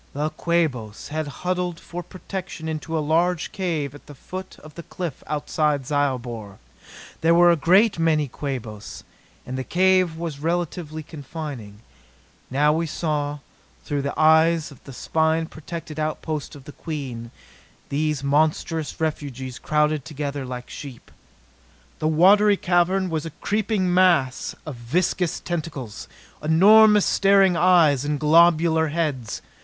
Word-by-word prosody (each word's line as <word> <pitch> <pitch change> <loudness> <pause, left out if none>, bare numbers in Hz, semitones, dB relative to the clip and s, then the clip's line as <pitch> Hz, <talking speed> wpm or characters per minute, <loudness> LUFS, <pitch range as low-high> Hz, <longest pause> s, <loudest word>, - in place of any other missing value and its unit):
The 150 +2 -2
Quabos 155 -11 -2
had 155 0 -3 0.2
huddled 180 -2 -1
for 175 +1 -7
protection 185 -2 -7
into 160 +1 -3
a 155 - -1
large 170 +2 +1
cave 160 -8 -2
at 145 - -15
the 145 - -11
foot 185 +7 -8
of 155 0 -12
the 170 - -8
cliff 170 -3 -6
outside 150 -2 -1
Zyobor. 125 -8 -2 0.6
There 165 +1 +4
were 175 0 +6
a - - +4
great 190 +5 +3
many 155 -3 +2
Quabos, 120 -6 -6 0.4
and 130 +1 -5
the - - -2
cave 185 0 +2
was 165 -4 -5
relatively 165 -1 -3
confining. 140 -9 -8 0.7
Now 150 +3 +3
we 165 +1 -1
saw, 150 -2 -2 0.5
through 145 -1 -2
the 140 +2 -4
eyes 160 0 +4
of 140 - -16
the 135 - -9
spine 160 +4 0
protected 160 0 -8
outpost 155 -1 -3
of 140 - -12
the 145 - -10
Queen, 130 -8 -6 0.6
these 150 -1 -1
monstrous 155 +2 0
refugees 135 -5 -4
crowded 150 -1 +1
together 140 0 -5
like 125 -1 -7
sheep. 135 -5 -10 0.9
The 155 - 0
watery 200 +6 +5
cavern 185 +1 +1
was 160 0 -2
a 160 - -12
creeping 205 -3 0
mass 170 -9 +2
of 150 -6 -7
viscous 170 +8 -1
tentacles, 150 - -5 0.3
enormous 210 +6 +6
staring 195 -2 +4
eyes 165 -6 +4
and 145 0 -2
globular 160 +1 +4
heads. 145 -8 -3
155 Hz, 135 wpm, -23 LUFS, 145-175 Hz, 0.9 s, were